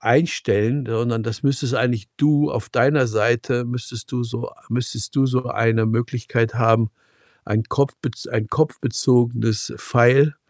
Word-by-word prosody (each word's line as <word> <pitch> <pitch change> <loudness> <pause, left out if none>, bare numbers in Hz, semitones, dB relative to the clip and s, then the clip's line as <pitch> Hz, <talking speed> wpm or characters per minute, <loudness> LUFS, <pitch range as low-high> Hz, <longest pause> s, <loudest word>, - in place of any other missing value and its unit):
einstellen, 135 -5 +1
sondern 115 0 -1
das 115 -1 -5
müsstest 135 -2 0
eigentlich 120 -5 0
du 145 0 +3
auf 115 -1 -4
deiner 135 -1 +3
Seite 120 +3 0
müsstest 120 -2 -6
du 125 -1 -2
so 120 +1 -5 0.2
müsstest 115 -1 -3
du 135 - +3
so 125 -1 0
eine 115 -1 +1
Möglichkeit 115 0 -1
haben, 115 -2 +3 0.5
ein 110 +2 -1
Kopfbez 140 -2 -2
ein 110 -3 -2
kopfbezogenes 120 -6 +1
File 135 +4 +4
120 Hz, 130 wpm, -21 LUFS, 115-130 Hz, 0.5 s, File